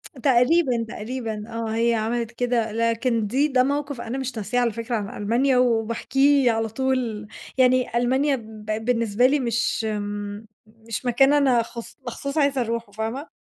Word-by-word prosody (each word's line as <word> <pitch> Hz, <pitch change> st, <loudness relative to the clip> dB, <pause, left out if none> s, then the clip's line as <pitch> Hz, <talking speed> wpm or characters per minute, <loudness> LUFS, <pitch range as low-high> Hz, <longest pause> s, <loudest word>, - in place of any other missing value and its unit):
تقريبًا، 255 Hz, 0 st, +3 dB
تقريبًا، 220 Hz, -2 st, -5 dB
آه 230 Hz, -1 st, -4 dB
هي 235 Hz, +1 st, +2 dB
عملِت 230 Hz, +1 st, -1 dB
كده. 240 Hz, -2 st, 0 dB
لكن 230 Hz, 0 st, 0 dB
دي 275 Hz, +7 st, +2 dB
ده 255 Hz, -3 st, +3 dB
مَوقِف 285 Hz, -2 st, -2 dB
أنا 240 Hz, +3 st, -4 dB
مش 260 Hz, -3 st, -4 dB
ناسياه 245 Hz, +4 st, -1 dB
على 235 Hz, -2 st, +1 dB
فكرة 230 Hz, +2 st, -3 dB
عن 205 Hz, -1 st, -4 dB
ألمانيا 250 Hz, +5 st, +2 dB
وباحكيه 250 Hz, +3 st, +3 dB
على 225 Hz, 0 st, -1 dB
طول، 235 Hz, -3 st, -2 dB, 0.3 s
يعني 255 Hz, -2 st, +3 dB
ألمانيا 265 Hz, +4 st, +2 dB
بقت 215 Hz, 0 st, -5 dB
بالنسبة 230 Hz, -1 st, +1 dB
لي 290 Hz, +2 st, +2 dB
مش، 235 Hz, -2 st, 0 dB
إمم 205 Hz, 0 st, -4 dB, 0.2 s
مش 225 Hz, +2 st, -7 dB
مكان 270 Hz, +4 st, +4 dB
أنا 265 Hz, -5 st, +4 dB
خص 235 Hz, 0 st, -8 dB
مخصوص 280 Hz, +5 st, -4 dB
عايزة 280 Hz, -3 st, +2 dB
أروحه، 230 Hz, -2 st, -3 dB
فاهمة. 225 Hz, +8 st, -4 dB
235 Hz, 155 wpm, -23 LUFS, 225-260 Hz, 0.3 s, مكان